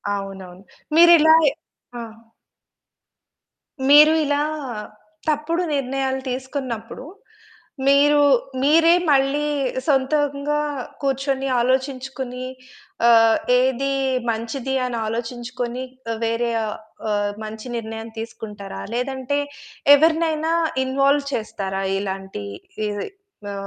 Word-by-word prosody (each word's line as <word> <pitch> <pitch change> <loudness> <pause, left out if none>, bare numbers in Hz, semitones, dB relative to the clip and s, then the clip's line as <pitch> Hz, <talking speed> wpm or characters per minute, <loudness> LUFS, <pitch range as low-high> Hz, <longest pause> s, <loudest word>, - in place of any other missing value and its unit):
అవునవును. 190 -2 -8 0.3
మీరిలాయె 320 -3 +7 0.5
ఆ! - - -5 1.9
మీరు 300 +2 +8
ఇలా 290 0 +1 0.9
తప్పుడు 320 +4 0
నిర్ణయాలు 265 0 -1
తీసుకున్నప్పుడు, 255 -2 -5 0.8
మీరు 290 +1 +5 0.4
మీరే 330 +3 +5 0.2
మళ్ళీ 280 +2 +2 0.4
సొంతంగా 285 +1 +1 0.4
కూర్చొని, 270 0 -1
ఆలోచించుకుని, 260 0 -2 0.6
ఆహ్, 225 -1 +6 0.2
ఏదీ 265 +2 0 0.4
మంచిది 240 +4 -3
అనాలోచించుకొనీ 240 +2 -4 0.3
ఆహ్, 225 - -6
వేరే 230 +1 0
ఆహ్, 210 - -4 0.3
ఆహ్, 205 0 0
మంచి 215 +3 -7
నిర్ణయం 225 0 -6
తీసుకుంటారా 210 -3 -7
లేదంటే 265 +2 -2 0.6
ఎవరినైనా 320 +1 +2 0.3
ఇన్వాల్వ్ 275 +2 +2
చేస్తారా 195 -3 -3 0.2
ఇలాంటీ 190 - -5 0.4
ఈ - - -1 0.6
మా 200 - -5
260 Hz, 80 wpm, -22 LUFS, 225-285 Hz, 1.9 s, మీరు